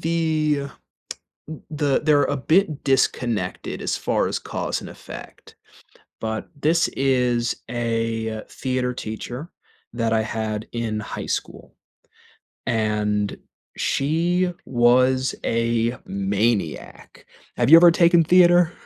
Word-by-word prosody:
th 155 -3 0 1.0
the 145 -3 +1
they're 145 -2 +4
a 145 - -1
bit 155 +2 +1
disconnected 120 -7 -1
as - - -1
far - - 0
as - - -2
cause - - -4
and - - -9
effect, - - -12 0.6
but 110 0 -4
this 165 +3 +2
is 125 -3 +1 0.2
a 115 -2 -2
theater 125 -1 -2
teacher 125 +7 -6 0.4
that 115 -1 0
I 110 - +2
had 110 -1 -3
in 115 -2 -2
high 105 - -6
school, - - -5 0.9
and 105 -2 0 0.4
she 175 +5 +1
was 130 +2 +3
a 115 +1 0
maniac. 100 - -2 0.3
Have 120 +2 +1
you 165 - +11
ever 175 0 +8
taken 170 0 +4
theater? 175 0 +5
125 Hz, 110 wpm, -22 LUFS, 110-155 Hz, 1.0 s, you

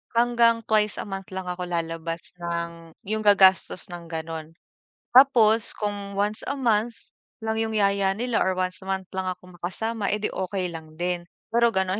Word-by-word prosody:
hanggang 235 -1 +4
twice 215 -1 +2
a - - -6
month 195 -1 -6
lang 190 -1 -4
ako 180 0 -3
lalabas 165 0 -3 0.2
ng 170 -1 -4
'yong 215 0 -1
gagastos 190 -2 +5
ng 170 -1 -7
ganun. 160 0 -5 0.6
Tapos 230 -5 +6
kung 205 -1 -4
once 210 +2 0
a 280 - -1
month 230 -2 +1 0.5
lang 220 0 -1
'yong 220 0 -1
yaya 200 -1 +3
nila 240 -1 0
or 185 0 +1
once 185 0 -1
a - - -10
month 190 -1 -2
lang 190 0 -2
ako 180 0 -8
makasama, 215 +4 -2
eh 210 - +1
'di, - - 0
okey 185 -1 -2
lang 160 -1 -9
din. 175 0 -2 0.3
Pero 235 0 +4
gano'n 190 +1 +1
195 Hz, 175 wpm, -25 LUFS, 175-220 Hz, 0.6 s, Tapos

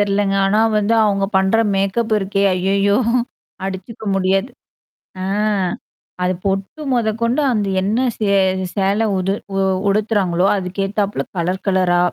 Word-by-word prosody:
தெரிலங்க. 200 -1 +1
ஆனா 205 +2 +2 0.2
வந்து 210 +2 +1
அவுங்க 200 -2 +1
பண்ற 190 +3 +3 0.2
மேக்கப் 200 +4 0
இருக்கே! 195 0 -1
ஐய்யய்யோ! 195 +2 +1 0.7
அடிச்சுக்க 195 +4 -6
முடியாது. 195 +5 +1 0.7
ஆ. - - -3 1.0
அது 180 +1 +1
பொட்டு 195 +9 -2
மொதக்கொண்டு 230 +3 0
அந்த 210 -4 0
என்ன 205 +5 0 0.2
சே 215 - -1 0.5
சேலை 200 +2 +1
உது 190 +1 0 0.2
உ - - -1 0.3
உடுத்துறாங்களோ! 195 -4 +1
அதுக்கேத்தாப்ல 195 +2 -2
கலர் 180 +2 -2
கலரா. 185 -2 +2
195 Hz, 120 wpm, -19 LUFS, 190-210 Hz, 1.0 s, பண்ற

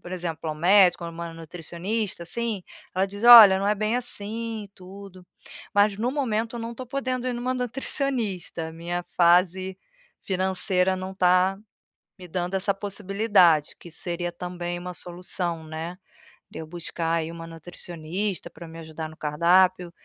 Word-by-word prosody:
por 175 - -9
exemplo, 165 -3 -4
ao 155 - -2
médico 180 +1 +4
ou 170 - -5
uma 165 0 -7
nutricionista, 175 +5 -4
assim, 220 +2 -3 0.3
ela 190 +2 +2
diz: 205 +3 -7
"Olha, 220 -6 +11
não 195 - -1
é 210 - +3
bem 215 +3 0
assim 225 -1 -4
e 200 - -13
tudo". 190 -1 -13 0.5
Mas, 205 0 +4
no 240 +3 0
momento, 230 -4 -1
eu - - -5
não 230 +1 -5
tô 255 +1 -7
podendo 255 -1 -3
ir 255 - 0
numa 245 +2 -2
nutricionista, 245 - -3
a - - -10
minha 175 +2 -4
fase 185 +2 +3 0.5
financeira 185 0 0
não 185 +1 -5
tá 185 +1 +3 0.6
me 180 -1 -11
dando 180 +2 -3
essa 200 +1 +1
possibilidade, 195 -5 +2
que 170 - -12
isso 160 - -3
seria 175 0 -3
também 175 0 -5
uma 180 0 -6
solução, 175 -1 -2
né, 160 +3 -6 0.5
de - - -8
eu 160 - -7
buscar 165 0 -3
aí 165 0 -1
uma 165 0 -8
nutricionista 170 +2 -5
pra 170 - -11
me 165 +1 -11
ajudar 160 0 -7
no 155 - -15
cardápio. 175 +4 +3
185 Hz, 165 wpm, -25 LUFS, 170-205 Hz, 0.6 s, Olha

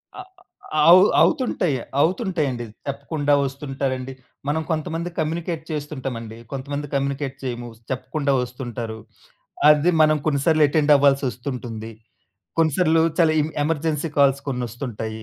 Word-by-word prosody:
అ 380 - -7 0.6
అ - - +3
అవు 180 +2 +9 0.2
అవుతుంటయి. 180 - +2 0.3
అవుతుంటయండి. 160 - 0 0.2
చెప్పకుండా 145 +1 -1
ఒస్తుంటారండి. 135 -1 -4 0.3
మనం 155 +2 0
కొంతమంది 165 +2 -2
కమ్యూనికేట్ 160 +1 -2
చేస్తుంటమండి. 130 -7 -5
కొంతమంది 140 +2 -4
కమ్యూనికేట్ 140 0 -1
చేయము 120 -2 -4 0.2
చెప్పకుండా 135 +2 -2
ఒస్తుంటారు. 120 -3 -6 0.7
అది 150 +3 +5
మనం 155 0 +4
కొన్నిసార్లు 155 +1 +3
అటెండ్ 150 0 +3
అవ్వా‌ల్సొ‌స్తుంటుంది. 125 -5 -1 0.7
కొన్నిసార్లు 160 +1 +3 0.2
చాలా 165 -2 +5
ఎమ్ 155 - -3
ఎమర్జెన్సీ 160 0 -1
కాల్స్ 140 -1 +4
కొ‌న్నొస్తుంటాయి. 120 -3 -4
140 Hz, 105 wpm, -22 LUFS, 130-155 Hz, 0.7 s, అవు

